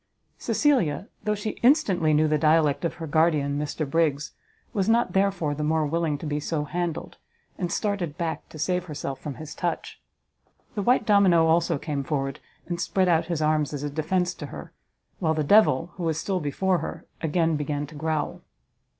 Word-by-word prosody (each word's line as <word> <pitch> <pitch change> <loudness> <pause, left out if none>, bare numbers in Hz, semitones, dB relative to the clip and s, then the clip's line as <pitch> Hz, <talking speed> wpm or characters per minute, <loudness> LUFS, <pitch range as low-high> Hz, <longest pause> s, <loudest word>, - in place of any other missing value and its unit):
Cecilia, 220 - +1 0.2
though 210 0 +1
she 210 +1 -5
instantly 200 - +4
knew 155 +1 +4
the 150 0 +1
dialect 155 -1 +3
of 170 - -2
her 165 - -6
guardian 150 -2 +2
Mr 150 0 -3
Briggs, 150 -1 +1 0.4
was 200 0 0
not 230 -5 +2
therefore 190 -6 +1
the 150 +1 -3
more 155 0 +1
willing 160 -1 0
to 150 - -8
be 150 0 -1
so 150 0 -2
handled, 170 +2 -4 0.4
and 175 -3 -2
started 185 -8 -2
back 165 -2 -3
to - - -11
save 180 +4 0
herself 140 -4 -5
from 145 -3 -6
his 155 0 -8
touch; 175 -2 -4 0.7
the 210 - -2
white 240 +2 +3
domino 195 -6 +5
also 165 -1 +2
came 140 -1 -3
forward, 135 -2 -2 0.3
and 175 0 -3
spread 190 -1 +1
out 165 -1 +3
his 165 -3 -1
arms 155 -1 +1
as 145 -1 -4
a 145 - -3
defence 180 +4 0
to - - -8
her, - - -9 0.5
while 160 -3 +1
the 155 - 0
devil, 170 -2 +4
who 180 - -4
was 160 -1 0
still 190 -2 -1
before 180 +4 0
her, - - -6 0.2
again 165 0 +1
began 145 0 -2
to 150 - -14
growl. 155 0 -2
160 Hz, 185 wpm, -25 LUFS, 150-180 Hz, 0.7 s, domino